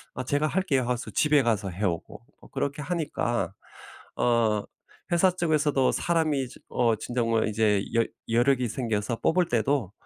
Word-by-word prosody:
"아 - - -3
제가 145 +4 +1
할게요." 155 -6 +1
하고서 120 0 -2
집에 150 -1 +3
가서 110 -4 0
해오고 90 -2 -3 0.2
어 - - -15
그렇게 140 +1 -3
하니까 145 - -2 0.6
어 115 -3 +2 0.5
회사 175 +2 +4
쪽에서도 155 -6 +1
사람이 155 -6 0
지 - - -14
어 115 -2 +2
진정 120 +1 -2
뭐 115 -1 +2
이제 105 -2 +2
여 115 - +4 0.3
여력이 120 +2 +2
생겨서 115 -1 -2
뽑을 175 +1 +2
때도 120 -2 0
125 Hz, 305 characters per minute, -26 LUFS, 115-150 Hz, 0.6 s, 회사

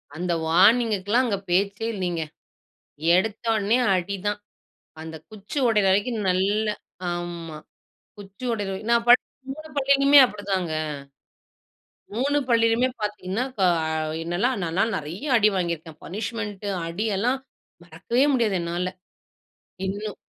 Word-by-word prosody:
அந்த 175 +2 -2 0.2
வார்னிங்குக்குலாம் 210 +5 +4
அங்க 210 -5 0
பேச்சே 200 +4 +1
இல்லீங்க. 180 -4 -2 1.0
எடுத்தோனே 220 +2 +1 0.2
அடி 185 +2 -1
தான். 205 0 -1 0.6
அந்தக் 160 -1 -9
குச்சு 215 +7 -8
ஒடைற 210 -4 +3
வரைக்கும் 205 +2 +1
நல்ல 195 +4 +1 0.5
ஆம்மா. 170 -2 -5 0.6
குச்சி 200 +4 -10
ஒடைற 205 -4 -2
வை 190 - -5
நான் 235 0 +3
படிச்ச 245 +1 +7 0.3
3 310 +1 -10
பள்ளிலயுமே 275 +1 +6
அப்படித்தாங்க. 195 -6 -3 1.4
3 280 +5 +1
பள்ளியிலுமே 230 +2 +3
பாத்தீங்கன்னா 210 +1 -2
இப்போ 205 -7 0 0.2
அ - - -1 0.4
என்னெல்லாம்? 185 +10 0
நால் 165 +2 -3
நான் 225 +1 +2
நெறைய 170 - -6
அடி 215 -1 +5
வாங்கி 170 -2 0
இருக்கேன். 160 -1 -14
பனிஷ்மென்ட் 205 0 -5 0.2
அடி 175 +6 -3
எல்லாம் 250 +6 +1 0.4
மறக்கவே 185 - 0
முடியாது. 230 -6 +2
என்னால 175 +2 -2 1.0
இன்னும் 205 +1 -4
205 Hz, 120 wpm, -24 LUFS, 180-230 Hz, 1.4 s, படிச்ச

